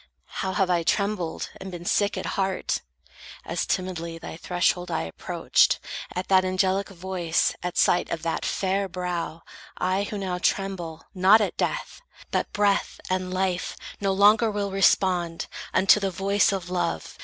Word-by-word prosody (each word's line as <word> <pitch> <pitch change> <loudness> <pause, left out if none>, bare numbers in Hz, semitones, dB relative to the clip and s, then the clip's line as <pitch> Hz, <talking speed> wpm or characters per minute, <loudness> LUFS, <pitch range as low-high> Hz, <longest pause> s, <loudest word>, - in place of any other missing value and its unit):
How 190 0 -1
have 195 -3 +2
I 175 -1 +3
trembled, 200 -1 -1
and 190 - -8
been 175 -1 -8
sick 200 +3 +1
at - - -4
heart, 190 -1 -1 0.6
As - - -2
timidly 170 -3 -2
thy 165 - -8
threshold 180 +1 0
I 165 - -1
approached, 80 - +1 0.4
At 180 +1 -3
that 190 -1 +5
angelic 185 +1 +1
voice, 180 -3 0
at 180 0 -4
sight 175 - +3
of 165 -1 -3
that 165 -1 -1
Fair 195 0 0
brow, 175 -2 -4 0.3
I, 190 +2 0
who 210 - -5
now 185 -2 -3
tremble 180 -5 -1
not 190 +4 +6
at 210 - -1
death! - - -2 0.3
But - - -1
breath 205 -1 +1
and 185 0 -1
life 185 -1 -1 0.2
no 195 -1 +1
longer 210 +4 +5
will 205 -1 -2
respond 180 -3 +2 0.3
Unto 190 +2 +5
the 195 -1 0
voice 195 +3 +2
of 185 -2 -4
love. 85 - -2
185 Hz, 155 wpm, -25 LUFS, 175-195 Hz, 0.6 s, not